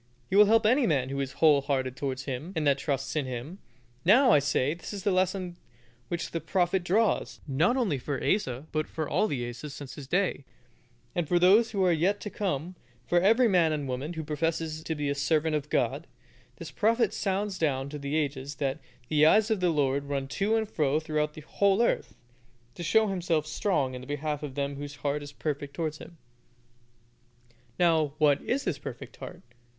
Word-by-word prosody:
He - - +1
will 210 +1 +8
help 225 +1 +4
any 250 +4 +4
man 135 -5 +1
who 140 0 -3
is 135 -1 -3
whole 150 -2 +4
hearted 130 -2 -1
towards 135 -3 -3
Him 140 +7 -5
that 145 -5 +1
trusts 135 -1 -2
in 145 -4 -1
Him. 130 +9 -6 0.4
Now, 245 +8 +6
I 150 - +6
say, 145 0 +1
this 170 +4 -8
is 200 -2 -6
the 205 - +2
lesson 185 -1 0 0.5
which 170 +3 -4
the 165 - -3
prophet 180 0 0
draws, 205 +4 +1
not 160 - +2
only 195 - 0
for 135 +1 -3
Asa, 135 - -1
but 155 0 -1
for 155 -2 -4
all 215 - +1
the 125 - -3
Asas 135 +5 -7
since 140 -3 -8
his 145 -3 -9
day, 180 -2 0 0.7
and 175 -3 -1
those 185 +7 +5
who 195 -3 0
are 180 - +4
yet 180 +5 +1
to 210 - -6
come, 180 -3 -3 0.3
for 175 - +3
every 225 +6 +5
man 175 -6 +3
and 145 -2 -2
woman 130 +6 -4
who 160 -1 -5
professes 155 +1 -2
to 160 - -2
be 150 -1 -2
a 140 - +1
servant 155 +2 +1
of 150 0 -3
God, - - 0 0.5
the - - -9
prophet 230 0 +2
sounds 195 0 -2
down 135 -4 0
to 150 0 -6
the 140 +1 -3
ages 140 -2 -2
that 140 +1 -2 0.3
"the 150 +1 +2
eyes 215 +6 +4
of 215 - +1
the 180 -1 +2
Lord 140 -3 +1
run 140 -1 -3
to 200 +8 0
and 220 -1 0
fro 150 -5 +1
throughout 150 -1 -2
the 155 - -8
whole 195 +6 +1
earth, - - -1 0.6
to - - -9
show 220 +6 +3
Himself 175 -6 0
strong 155 -4 0
in 125 - -6
the 130 - -11
behalf 145 0 -3
of 145 -3 -6
them 140 -1 -2
whose 145 0 -7
heart 145 +1 0
is 145 0 -8
perfect 145 -1 -4
towards 155 -2 -3
Him." 170 - -12 1.6
Now, 160 -4 +2
what 150 -2 +3
is 270 +3 -1
this 165 -7 -2
perfect - - -8
heart? - - -9
155 Hz, 200 wpm, -28 LUFS, 140-185 Hz, 1.6 s, will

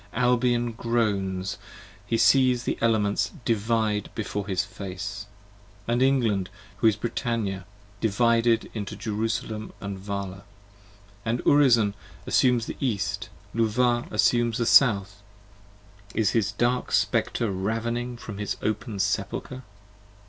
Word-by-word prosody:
Albion 120 -1 +2
groans, 100 -5 -1 0.5
he 115 - +1
sees 130 -1 +4
the - - -1
Elements 110 -3 +1
divide 110 -1 0
before 105 -2 -3
his 95 -2 0
face, 100 +1 -6 0.6
And 120 +1 +1
England, 115 -8 +2 0.3
who 115 - +3
is 110 - +4
Brittannia, 110 -4 -2 0.3
divided 115 +1 +2
into 105 -3 -5
Jerusalem 110 0 -3
& - - -27
Vala: 100 -1 -5 0.8
And 115 +2 -1
Urizen 120 -8 +4 0.3
assumes 125 -3 +3
the - - -6
East, 105 -3 -2 0.2
Luvah 120 +2 +1
assumes 120 +2 +2
the 120 - 0
South, 100 -5 +4 0.9
30 - - -3
Is 105 -3 +3
his 105 -3 +1
dark 120 +4 0
Spectre 115 -4 +1
ravening 115 +5 -2
from 105 -3 -8
his 105 - -3
open 110 0 -2
Sepulcher. 130 +5 -2
110 Hz, 115 wpm, -26 LUFS, 100-120 Hz, 0.9 s, sees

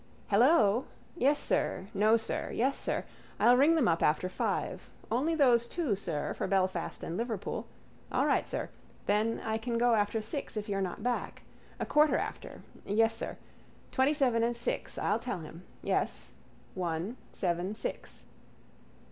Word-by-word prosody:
—Hello. 230 0 +4 0.3
Yes, 290 -2 +3
sir. 190 - 0
No, 215 +3 +4
sir. 225 - -3
Yes, 265 +4 +1
sir. - - -2 0.3
I'll 245 - +6
ring 290 +6 +5
them 300 -7 +3
up 165 -1 +2
after 155 +4 +2
five. - - -2 0.2
Only 290 +8 +1
those 245 -6 +4
two, 295 - -1
sir, 165 -6 -3
for - - -3
Belfast 185 -3 0
and 165 - -4
Liverpool. 225 -2 -3 0.4
All - - +2
right, - - +2
sir. - - -3 0.4
Then 215 +3 +1
I 220 0 -1
can 235 +1 -2
go 240 0 +4
after 210 +1 +1
six 220 +2 -3
if 210 +1 -3
you're 195 -1 -1
not 190 +2 -3
back. 245 0 -2 0.4
A - - -1
quarter 300 0 +4
after. - - -5 0.2
Yes, 225 +2 +2
sir. - - -4 0.5
Twentyseven 265 -3 +2
and 235 +1 +1
six. 235 - -2
I'll 210 +3 +1
tell 230 -7 -4
him. 165 +3 -11 0.2
Yes: - - -1 0.4
one, 175 +4 -2 0.2
seven, 180 +2 -1
six. - - -6
225 Hz, 155 wpm, -31 LUFS, 195-250 Hz, 0.5 s, I'll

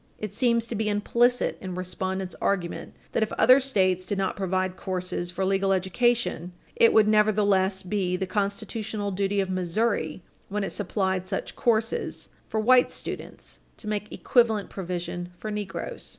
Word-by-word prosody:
It 215 -1 -5
seems 235 +1 +2
to 235 - -5
be 220 -1 -1
implicit 235 +4 +2
in 185 -2 -5
respondents' 185 +1 -3
argument 180 -4 -2 0.2
that, - - 0
if 220 - 0
other 255 +2 +6
States 190 -9 +1
did 200 +2 -3
not 195 -1 0
provide 185 -1 -1
courses 180 -2 -3
for 190 +2 -2
legal 195 0 +2
education, 190 -1 +1 0.2
it 230 - +6
would 215 -1 +5
nevertheless 205 -3 +3
be 185 -1 -1
the 190 +1 -2
constitutional 205 +2 -2
duty 200 +1 0
of 190 -1 -3
Missouri, 185 -2 -1 0.3
when 205 +1 -1
it 195 - -3
supplied 190 -2 -1
such - - -4
courses 225 -1 0 0.2
for 220 - -1
white 250 +3 +5
students, - - -6 0.2
to 210 - -10
make 210 0 -3
equivalent 225 -5 +2
provision 175 -1 -4
for 215 - -5
negroes. 205 -2 -5
200 Hz, 155 wpm, -26 LUFS, 185-215 Hz, 0.3 s, other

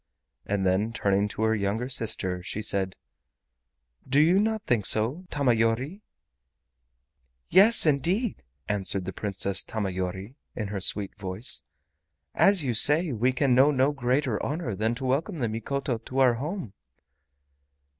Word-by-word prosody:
And 100 -1 -1
then 100 +5 0
turning 100 -2 0
to 105 +2 -5
her 110 0 +2
younger 110 +3 -2
sister, 105 -7 0
she 105 +4 -6
said: 95 -3 -2 1.1
"Do 140 +2 +3
you 170 +6 +4
not 220 0 -1
think 115 -5 +1
so, 130 +12 +1
Tamayori?" 125 - -1 1.5
"Yes, 200 +5 +7
indeed," 175 - 0 0.3
answered 100 -2 -1
the 95 - -6
Princess 100 -1 -1
Tamayori, 95 0 -5 0.2
in 105 -4 -5
her 100 -1 -5
sweet 100 +1 -1
voice. 95 +4 -1 0.7
"As 195 -4 +5
you 125 -3 -1
say, 150 +8 +6
we 125 +2 0
can 130 0 0
know 135 +4 +5
no 135 0 +1
greater 130 -3 -1
honor 145 -6 -4
than 110 +4 -2
to 130 +2 -6
welcome 155 +9 -2
the 120 -5 -2
Mikoto 120 +3 -4
to 130 +3 -9
our 130 -2 +4
home." 145 - -6
120 Hz, 140 wpm, -26 LUFS, 100-145 Hz, 1.5 s, Yes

